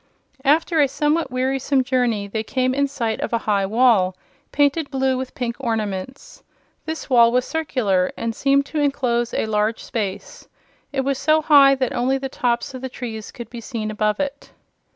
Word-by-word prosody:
After 315 +3 +3
a 285 - +4
somewhat 300 +4 0
wearisome 260 +1 0
journey 245 -5 0
they 215 +2 -3
came 255 +3 0
in 280 +1 +1
sight 235 -5 -3
of - - -3
a - - +3
high 200 -2 +1
wall, 215 -5 +3 0.4
painted 290 +1 +1
blue 265 -1 0
with 255 0 -5
pink 235 -2 -3
ornaments. 225 -1 -4 0.5
This 320 0 -4
wall 235 -3 +5
was 250 +1 +1
circular, 230 -13 0
and 230 0 -2
seemed 275 +3 +2
to 305 - -4
enclose 245 -5 0
a - - -1
large 215 +1 -1
space. 205 -6 -5 0.4
It 275 -2 0
was 270 0 -1
so 310 0 +3
high 280 -3 +7
that 260 -2 -1
only 260 +2 +1
the 270 0 -5
tops 245 0 -1
of 255 - -7
the 260 - -4
trees 225 -4 -7
could 235 -2 -10
be 240 -1 -7
seen 220 -2 -4
above 210 0 0
it. 285 0 -4
255 Hz, 180 wpm, -21 LUFS, 225-275 Hz, 0.5 s, high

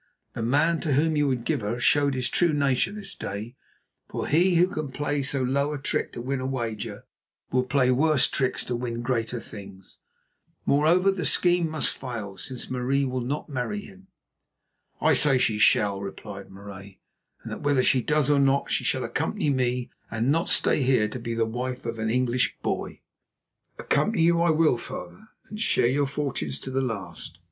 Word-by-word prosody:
The - - -5
man 150 +8 +2
to 150 - -1
whom 155 +3 +2
you 145 -1 +2
would 125 -3 -1
give - - 0
her 105 +4 -3
showed 140 +2 +3
his 125 -1 0
true 170 -3 +2
nature 140 +3 +1
this 205 -1 -5
day, 105 +5 -6 0.5
for - - -3
he 175 +4 +3
who 170 +1 +6
can 155 -7 -4
play 145 +1 -1
so 135 -1 +1
low 140 +3 0
a - - -3
trick 135 - -1
to 120 - -6
win 135 +1 -2
a 130 - -4
wager, 115 -5 -4 0.5
will 125 0 +2
play 130 0 +2
worse 150 +2 +4
tricks 130 -2 -1
to 125 - -2
win 120 -1 -4
greater 120 -1 -1
things. 100 -4 -11 0.7
Moreover, 170 +7 +4
the 195 -2 -3
scheme 175 -2 +3
must 155 -1 -2
fail 115 -7 -6
since 130 -4 -5
Marie 130 +2 0
will 130 -1 -2
not 140 +5 -3
marry 140 +9 -3
him." 195 -1 -15 0.9
"I - - +4
say 140 -3 +4
she 110 -4 +1
shall," 100 -2 +3
replied 100 0 -8
Marais; 95 0 -11 0.4
"and - - -7
that - - -6
whether 145 -3 +2
she 130 - +3
does 150 +2 +1
or 145 -1 +3
not, 140 0 +2
she - - +1
shall - - 0
accompany 145 - -1
me 125 -2 -1 0.2
and 115 +4 0
not 165 +3 +1
stay - - +3
here 125 -5 +3
to 125 - -6
be 115 0 -4
the 115 0 +1
wife 125 +2 -4
of 115 -1 -4
an 110 0 -1
English 125 +1 +1
boy." - - -3 0.8
"Accompany 215 -6 +1
you 170 0 +4
I 170 - +3
will, 155 -5 +3
father, 90 -6 -7 0.2
and 210 - -8
share 225 - +2
your 140 +3 +2
fortunes 135 - -3
to - - -6
the 135 +1 0
last. 95 -8 -5
130 Hz, 190 wpm, -26 LUFS, 115-150 Hz, 0.9 s, who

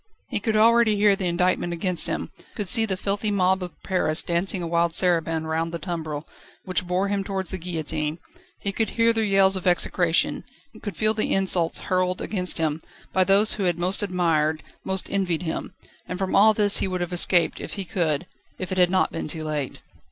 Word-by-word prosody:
He - - -1
could 220 -3 -1
already 230 0 +4
hear 205 -1 +4
the 190 -2 -3
indictment 175 0 0
against 175 +1 0
him, - - -4 0.2
could 205 -3 -4
see 225 +4 +5
the 190 -2 -2
filthy 200 +2 -2
mob 190 -1 +1
of 180 -1 -9
Paris 170 -4 +3
dancing 175 +2 -1
a - - -3
wild 170 0 +1
saraband 165 -3 +2
round 165 +1 -2
the 170 - -4
tumbril, 160 -4 -5 0.4
which 185 -1 -2
bore 185 +2 0
him 200 -1 -1
towards 195 -1 -3
the 190 - -4
guillotine; 160 -2 -3 0.4
he 200 - -2
could 220 +1 -1
hear 230 0 +4
their 225 -1 0
yells 195 -2 +3
of 185 -1 -3
execration, 175 -1 +1 0.4
could 205 - -6
feel 215 0 +1
the 215 - -2
insults 185 -3 +1
hurled 185 0 -1
against 180 -4 -1
him, 160 -1 -1 0.3
by 190 - +3
those 200 +3 +4
who 200 - -2
had 175 -2 0
most 180 +3 +1
admired, 165 -5 0 0.2
most 190 -1 0
envied 180 -4 -1
him. 160 - -5 0.3
And 180 - -5
from 190 0 -2
all 215 +2 +6
this 205 -1 +3
he - - 0
would 185 -1 -3
have 175 0 -3
escaped 175 0 +2
if - - -7
he 195 -2 -5
could, 170 -5 -1 0.3
if 185 -1 -6
it 185 - -1
had 180 -1 +5
not 185 0 +1
been 165 - -5
too 160 +1 -4
late. 150 -3 -4
185 Hz, 205 wpm, -24 LUFS, 170-195 Hz, 0.4 s, all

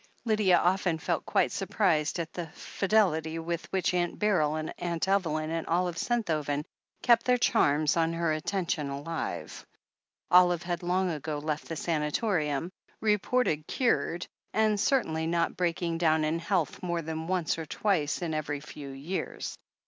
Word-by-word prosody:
Lydia 210 -5 +4
often 180 -1 +2
felt - - -2
quite - - +2
surprised 160 -7 +1
at 165 -2 -4
the 175 -2 -4
fidelity 180 -6 +1
with 170 +1 -4
which 190 -1 +1
Aunt 175 -1 0
Beryl 165 -8 +2
and 155 0 -3
Aimt 170 0 -1
Evelyn 160 -5 +1
and 165 0 -2
Olive 175 +1 +1
Sentho 215 -11 0
ven 145 +1 -2 0.4
kept 235 -2 +5
their 250 0 +5
claims 150 -9 +3
on 165 -1 +2
her 165 -1 +1
attention 155 -2 -1
alive. 145 +4 -4 0.7
Olive 175 -1 +6
had 175 -1 -2
long 180 +1 +1
ago 155 -1 -3
left 150 +1 -3
the 165 - -3
sanatorium, 155 0 0 0.3
reported 210 -6 +1
cured, 205 -9 0 0.3
and 215 -1 +2
cer 270 +4 +3
tainly 160 0 -2
not 170 -1 +1
breaking 170 -1 -1
down 160 -2 +3
in 155 +2 0
health 170 -2 -1
more 175 -2 -2
than 160 +1 -4
once 175 -3 0
or 160 - -5
twice 175 -5 0
in 165 -2 -2
every 145 -1 -2
few 145 -1 -9
years. 140 +8 -4
170 Hz, 155 wpm, -29 LUFS, 155-185 Hz, 0.7 s, Olive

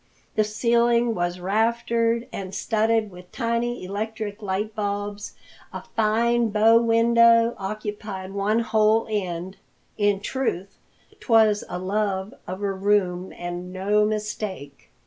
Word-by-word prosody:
The 215 - +2
ceiling 235 +2 +2
was 175 -1 -2
raftered 230 +4 0
and 190 -1 -6
studded 220 0 +1
with 180 0 -14
tiny 235 -1 -2
electric 215 +1 -4
light 205 +2 -2
bulbs. 205 0 -4 0.4
A - - -7
fine 230 +2 +2
bow 220 +2 +5
window 230 0 +4
occupied 205 -1 -5
one 205 +3 +1
whole 220 0 +2
end. 185 -2 -3 0.4
In 205 -1 +2
truth, 200 -5 -3 0.4
'twas 220 -3 +3
a 180 - -4
love 195 +1 -2
of 185 +3 -5
a 200 -1 0
room 190 -2 0
and 175 +1 -6
no 200 +3 +1
mistake. 210 -8 -4
210 Hz, 120 wpm, -24 LUFS, 195-230 Hz, 0.4 s, bow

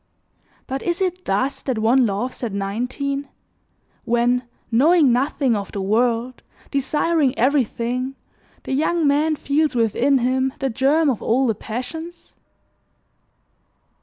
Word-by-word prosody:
But 270 0 -4
is 345 0 -2
it 365 -1 -2
thus 260 +8 -1
that 260 -4 -2
one 235 +3 +3
loves 210 +6 -3
at 235 -5 -3
nineteen 250 +8 -3 0.7
when, 240 +1 +1 0.2
knowing 290 +2 +5
nothing 265 -1 +1
of 200 -2 -4
the 200 - -4
world, 230 +5 0 0.3
desiring 290 +1 +1
everything, 255 0 0 0.5
the - - -4
young 315 +4 +1
man 300 +2 +2
feels 295 0 0
within 240 +4 +2
him 260 +1 0
the 270 -2 -2
germ 285 +7 +2
of 235 - -4
all 255 +4 +2
the 230 - +2
passions? 320 - -7
260 Hz, 125 wpm, -21 LUFS, 235-285 Hz, 0.7 s, knowing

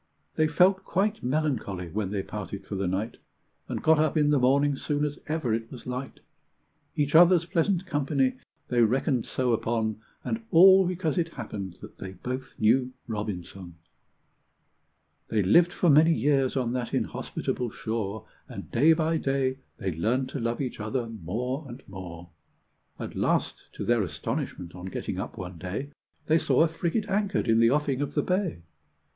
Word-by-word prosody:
They 155 - +2
felt 180 +5 +4
quite 205 +3 0
melancholy 125 - -1
when 100 0 -2
they 100 -1 -2
parted 100 -1 -6
for - - -7
the 95 -1 -1
night, 100 +6 -2 0.5
And - - -3
got 160 -1 +5
up 155 0 +2
in 150 -1 +3
the 145 - +4
morning 140 +3 +3
soon 145 +2 -1
as 145 -1 -4
ever 155 -7 -1
it 115 0 -2
was 125 - -10
light; 125 +1 -5 0.7
Each 145 -1 0
other's 175 +1 +7
pleasant 180 +2 +1
company 140 -5 0 0.3
they 120 -1 +3
reckoned 125 +2 +2
so 125 -2 0
upon, 110 -1 -1 0.2
And 225 0 -3
all 190 +2 +7
because 175 -2 -1
it 165 -1 0
happened 100 -7 -6
that - - -12
they 95 -1 -7
both 130 +7 -6
knew 125 +4 +3
Robinson! 95 -5 -5 1.5
They 105 -2 +1
lived 170 - +5
for 175 - 0
many 160 +3 +6
years 135 +1 +2
on 125 -2 0
that 125 -2 -2
inhospitable 125 -1 -2
shore, 110 -2 -4 0.2
And - - -8
day 155 +7 +5
by 160 0 +1
day 135 -2 0 0.2
they 95 -4 -2
learned 120 +11 0
to 140 - -4
love 115 +2 -1
each 130 -4 -4
other 115 +4 -2
more 115 - -3
and 125 +1 -10
more. 85 -3 -9 0.7
At - - -6
last, - - -1
to - - -5
their 120 -1 +3
astonishment, 85 0 -4
on 90 0 -9
getting 95 - -4
up - - -5
one 90 -2 -7
day, 100 - -5 0.3
They 160 +1 +4
saw - - +3
a - - +4
frigate 170 +6 -2
anchored 200 0 0
in 115 0 +4
the 115 0 +6
offing 140 -1 +1
of 145 - -3
the - - +2
bay. 180 - -1
130 Hz, 170 wpm, -27 LUFS, 110-155 Hz, 1.5 s, other's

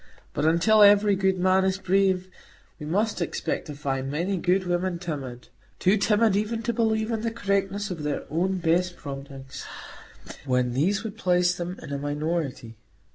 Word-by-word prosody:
But 145 - -1
until 175 +7 +4
every 205 0 +6
good 190 0 +1
man 185 +1 +3
is 190 0 +1
brave, 190 -1 +1 0.5
we 150 - -6
must 205 +4 0
expect 170 - -2
to 150 - -7
find 135 -2 -3
many 170 +7 -1
good 185 +1 +1
women 175 0 -1
timid,—too 150 - -3
timid 210 0 +3
even 220 +2 -1
to 235 - -1
believe 220 0 0
in 225 -1 -1
the 230 - -1
correctness 200 -2 -1
of 170 -4 -5
their 150 -1 -2
own 185 +4 0
best 175 +1 +1
promptings, 135 -2 -8 0.8
when 125 -2 0
these 195 - +1
would 220 0 -7
place 180 -2 +3
them 180 +1 -5
in 140 - -6
a 140 - -2
minority. 145 -5 -3
180 Hz, 165 wpm, -26 LUFS, 150-200 Hz, 0.8 s, every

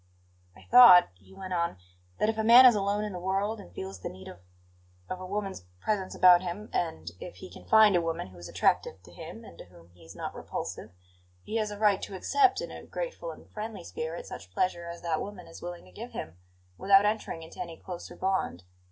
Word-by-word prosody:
"I - - -16
thought," 240 -8 +8
he - - -21
went 190 -1 -7
on; 170 - -1 0.4
"that - - +1
if 225 - 0
a - - +1
man 240 +3 +9
is 250 - +9
alone 205 0 0
in 210 -2 -4
the 180 - -5
world 195 +4 -1
and 85 - -12
feels 95 +1 -7
the - - -5
need 95 +1 -12
of 90 - -11 0.7
of 185 - -5
a 185 - -7
woman's 195 - -4 0.2
presence 195 - -2
about 180 -1 +7
him, 185 +4 -6
and 85 - -2
if 180 - -9
he 185 - -11
can - - -13
find 215 -3 +6
a 175 - +3
woman 165 - -3
who 95 - -16
is 85 - -9
attractive 95 -1 0
to 90 - -16
him 170 - -10
and - - -14
to - - -10
whom 85 -1 -19
he 90 0 -20
is 80 - -13
not - - -5
repulsive, - - -6 0.5
he 220 - -3
has 215 -1 -1
a 205 - -7
right 205 -2 +3
to 195 - -6
accept, 395 - +2
in - - -6
a - - -9
grateful - - -5
and - - -12
friendly 215 -3 -6
spirit, 160 0 -5
such 95 - -9
pleasure 170 - -1
as 170 0 -8
that 165 -2 -1
woman 205 -2 -7
is 165 - -12
willing 175 0 -7
to 90 - -17
give - - -9
him, 80 - -6 0.4
without 195 +1 +5
entering 210 -6 -2
into 160 - -13
any 170 -2 -7
closer 180 -2 -8
bond. 190 - -1
185 Hz, 230 wpm, -28 LUFS, 165-210 Hz, 0.7 s, man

